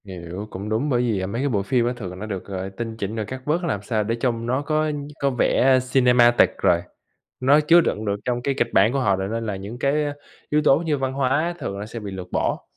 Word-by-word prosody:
Hiểu, 90 Hz, +1 st, -7 dB
cũng 100 Hz, +2 st, -6 dB
đúng 115 Hz, +7 st, 0 dB
bởi 120 Hz, -3 st, +2 dB
vì, 115 Hz, -5 st, 0 dB
à, -, -, -2 dB
mấy 115 Hz, +6 st, -3 dB
cái 140 Hz, -, 0 dB
bộ 105 Hz, -6 st, +1 dB
phim 120 Hz, +2 st, +1 dB
á 120 Hz, -, 0 dB
thường 90 Hz, -5 st, -7 dB
nó 105 Hz, -, -5 dB
được 100 Hz, -4 st, -5 dB
gọi 95 Hz, -1 st, -5 dB
tinh 115 Hz, +3 st, -6 dB
chỉnh 105 Hz, 0 st, -4 dB
rồi 110 Hz, -2 st, -2 dB
cắt 130 Hz, +5 st, -7 dB
bớt 165 Hz, +4 st, 0 dB
làm 140 Hz, -, -1 dB
sao 110 Hz, 0 st, 0 dB
để 115 Hz, +2 st, -1 dB
trông 115 Hz, -1 st, -1 dB
nó 130 Hz, +3 st, 0 dB
có 155 Hz, +1 st, 0 dB, 0.3 s
có 140 Hz, -, +3 dB
vẻ 130 Hz, +1 st, +3 dB
cinematic 125 Hz, -2 st, +5 dB
rồi, 85 Hz, -1 st, +3 dB, 0.6 s
nó 140 Hz, +4 st, +5 dB
chứa 165 Hz, +3 st, +6 dB
đựng 110 Hz, -8 st, -2 dB
được 100 Hz, -1 st, 0 dB
trong 120 Hz, -1 st, -1 dB
cái 140 Hz, +3 st, 0 dB
kịch 120 Hz, -3 st, 0 dB
bản 105 Hz, +5 st, +4 dB
của 140 Hz, -, +1 dB
họ 100 Hz, -7 st, +2 dB
rồi 95 Hz, 0 st, -3 dB
nên 115 Hz, 0 st, -2 dB
là 105 Hz, -3 st, -2 dB
những 100 Hz, +5 st, -8 dB
cái 145 Hz, +3 st, +1 dB
á 145 Hz, -, -2 dB, 0.4 s
yếu 150 Hz, +1 st, +2 dB
tố 135 Hz, -, +6 dB
như 160 Hz, -2 st, -1 dB
văn 130 Hz, -1 st, -2 dB
hóa 140 Hz, +6 st, 0 dB
thường 100 Hz, -8 st, -4 dB
nó 100 Hz, -, -5 dB
sẽ 115 Hz, +2 st, -7 dB
bị 105 Hz, -2 st, -7 dB
lược 90 Hz, -1 st, -8 dB
bỏ. -, -, -1 dB
120 Hz, 270 wpm, -23 LUFS, 100-135 Hz, 0.6 s, chứa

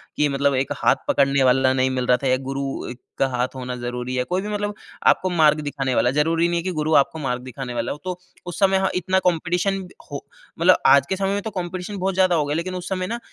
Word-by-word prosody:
कि 150 Hz, -, +2 dB
मतलब 140 Hz, 0 st, +1 dB
एक 130 Hz, +1 st, -1 dB
हाथ -, -, +3 dB
पकड़ने 140 Hz, -1 st, +3 dB
वाला 130 Hz, +1 st, +4 dB
नहीं 130 Hz, 0 st, +1 dB
मिल 130 Hz, -1 st, -1 dB
रहा 125 Hz, -, +4 dB
था, -, -, +1 dB
या 130 Hz, 0 st, +3 dB
गुरु 135 Hz, -2 st, -4 dB, 0.3 s
का 135 Hz, -, +3 dB
हाथ 125 Hz, 0 st, 0 dB
होना 125 Hz, -1 st, -5 dB
ज़रूरी 125 Hz, +1 st, -4 dB
है, 125 Hz, -, +1 dB
कोई 180 Hz, +7 st, -2 dB
भी 205 Hz, -, -6 dB
मतलब 205 Hz, 0 st, -2 dB, 0.3 s
आपको 185 Hz, -, +3 dB
मार्ग 155 Hz, -3 st, +4 dB
दिखाने 135 Hz, -3 st, -2 dB
वाला, 125 Hz, -, +3 dB
ज़रूरी 165 Hz, +4 st, +2 dB
नहीं 175 Hz, 0 st, 0 dB
है -, -, -5 dB
की 185 Hz, -, -2 dB
गुरु 155 Hz, +1 st, 0 dB
आपको 145 Hz, +3 st, +3 dB
मार्ग 125 Hz, -4 st, -2 dB
दिखाने 130 Hz, 0 st, -6 dB
वाला 120 Hz, 0 st, -2 dB
हो, -, -, -5 dB
तो 180 Hz, -1 st, -4 dB, 0.3 s
उस 175 Hz, -, -6 dB
समय 195 Hz, -1 st, +4 dB
हाँ, 190 Hz, 0 st, +1 dB
इतना 185 Hz, +1 st, +1 dB
कॉम्पिटिशन 180 Hz, +3 st, +1 dB, 0.4 s
हो, 140 Hz, -, -6 dB, 0.3 s
मतलब 180 Hz, +2 st, +5 dB
आज 140 Hz, -1 st, +6 dB
के 190 Hz, -, 0 dB
समय 195 Hz, +1 st, -1 dB
में 200 Hz, -, -1 dB
तो 220 Hz, -, -4 dB
कॉम्पिटिशन 185 Hz, +1 st, -5 dB
बहुत 190 Hz, +1 st, -1 dB
ज़्यादा 185 Hz, -1 st, +3 dB
हो 155 Hz, -3 st, +1 dB
गए 145 Hz, +1 st, -2 dB
लेकिन 180 Hz, +3 st, -3 dB
उस 180 Hz, 0 st, -6 dB
समय 185 Hz, -1 st, -2 dB
ना 235 Hz, +3 st, -4 dB
155 Hz, 250 wpm, -22 LUFS, 130-185 Hz, 0.4 s, आज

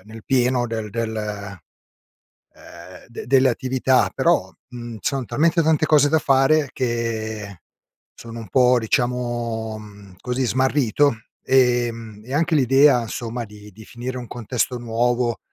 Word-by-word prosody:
nel 110 Hz, +1 st, -12 dB
pieno 125 Hz, -2 st, +1 dB
del 110 Hz, -2 st, -5 dB
del 115 Hz, 0 st, -3 dB, 1.2 s
ehm, 90 Hz, +2 st, -15 dB
delle 130 Hz, +3 st, +1 dB
attività 130 Hz, +1 st, +1 dB
però, -, -, +1 dB, 0.2 s
mhmm, 120 Hz, -2 st, -8 dB
son 135 Hz, -3 st, -2 dB
talmente 165 Hz, +7 st, +2 dB
tante 155 Hz, -1 st, +2 dB
cose 150 Hz, -2 st, +4 dB
da 160 Hz, +1 st, +3 dB
fare 135 Hz, +1 st, +3 dB
che 110 Hz, -5 st, -3 dB, 0.5 s
sono 115 Hz, 0 st, -10 dB
un 110 Hz, -5 st, -10 dB
po', 125 Hz, +3 st, +4 dB
diciamo, 120 Hz, -2 st, -2 dB
mhmm, 100 Hz, -3 st, -14 dB
così 125 Hz, +1 st, -2 dB
smarrito, 130 Hz, +1 st, +2 dB, 0.3 s
ehm, 120 Hz, -4 st, +1 dB
e 130 Hz, -, -7 dB
anche 160 Hz, +2 st, +1 dB
l'idea, 135 Hz, -1 st, +4 dB
insomma, 115 Hz, +1 st, -5 dB
di 105 Hz, -1 st, -14 dB
di 110 Hz, +2 st, -14 dB
finire 125 Hz, +2 st, -6 dB
un 120 Hz, -, -7 dB
contesto 125 Hz, +2 st, -2 dB
nuovo, 120 Hz, 0 st, -1 dB
120 Hz, 130 wpm, -21 LUFS, 115-130 Hz, 1.2 s, cose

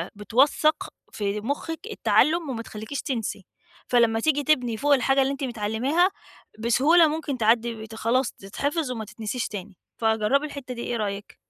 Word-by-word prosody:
بتوَثّق 270 Hz, +9 st, +2 dB, 0.2 s
في 205 Hz, 0 st, -2 dB
مُخِّك 290 Hz, +7 st, -3 dB
التّعلُّم 335 Hz, -6 st, +2 dB
وما 235 Hz, -3 st, -3 dB
تخلّيكيش 220 Hz, +5 st, -6 dB
تنسي، 225 Hz, -7 st, -3 dB, 0.4 s
فلمّا 235 Hz, -2 st, +3 dB
تيجي 290 Hz, +3 st, +1 dB
تبني 250 Hz, -7 st, +1 dB
فوق 290 Hz, +4 st, +3 dB
الحاجة 270 Hz, +1 st, +3 dB
اللي 270 Hz, +1 st, +1 dB
أنت 280 Hz, 0 st, -5 dB
متعلّماها، 245 Hz, -, +1 dB, 0.5 s
بسهولة 285 Hz, +9 st, +5 dB
ممكن 300 Hz, -3 st, -3 dB
تعدّي 230 Hz, +1 st, +2 dB
بت 220 Hz, 0 st, -9 dB
خلاص 235 Hz, +3 st, +1 dB
تتحفظ 280 Hz, -, -3 dB
وما 225 Hz, -3 st, -4 dB
تتنسيش 225 Hz, +3 st, -4 dB
تاني. 200 Hz, -2 st, -8 dB, 0.2 s
فجرّبي 225 Hz, +5 st, +2 dB
الحتة 280 Hz, -4 st, -7 dB
دي، 235 Hz, -, -7 dB
إيه 240 Hz, -, -2 dB
رأيِِك؟ 205 Hz, -1 st, -4 dB
245 Hz, 150 wpm, -25 LUFS, 220-285 Hz, 0.5 s, بسهولة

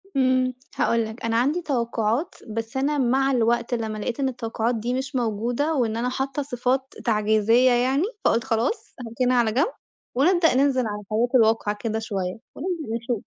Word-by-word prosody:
امم، 255 Hz, -1 st, +2 dB, 0.2 s
هاقول 230 Hz, -1 st, +1 dB
لك 220 Hz, +2 st, -7 dB
أنا 230 Hz, 0 st, +1 dB
عندي 285 Hz, +9 st, +1 dB
توقعات 235 Hz, 0 st, -1 dB
بس 225 Hz, +4 st, -4 dB
أنا 290 Hz, +3 st, +1 dB
مع 270 Hz, +1 st, +2 dB
الوقت 235 Hz, -1 st, +1 dB
لمّا 220 Hz, -2 st, -2 dB
لقيت 230 Hz, +5 st, -3 dB
إن 270 Hz, -1 st, +1 dB
التوقعات 230 Hz, -1 st, -2 dB
دي 235 Hz, +3 st, -2 dB
مش 265 Hz, +2 st, -3 dB
موجودة 240 Hz, +6 st, 0 dB
وإن 230 Hz, -4 st, 0 dB
أنا 245 Hz, +2 st, 0 dB
حاطّة 270 Hz, +3 st, -2 dB
صفات 260 Hz, 0 st, -1 dB
تعجيزية 220 Hz, +3 st, +3 dB
يعني، 255 Hz, +6 st, +2 dB, 0.2 s
فقُلت 230 Hz, -, +3 dB
خلاص 230 Hz, -, -2 dB
هاركنها 250 Hz, +2 st, +1 dB
على 230 Hz, -2 st, +3 dB
جنب، 275 Hz, -, +1 dB, 0.4 s
ونبدأ 330 Hz, +4 st, +4 dB
ننزل 260 Hz, -3 st, +2 dB
على 210 Hz, 0 st, -4 dB
الحياة 215 Hz, +4 st, 0 dB
الواقعية 220 Hz, -3 st, +3 dB
كده 220 Hz, -1 st, -1 dB
شوية 195 Hz, -4 st, -3 dB, 0.2 s
وننزل 320 Hz, -8 st, -3 dB
نشوف. 235 Hz, -3 st, -3 dB
240 Hz, 165 wpm, -24 LUFS, 225-265 Hz, 0.4 s, ونبدأ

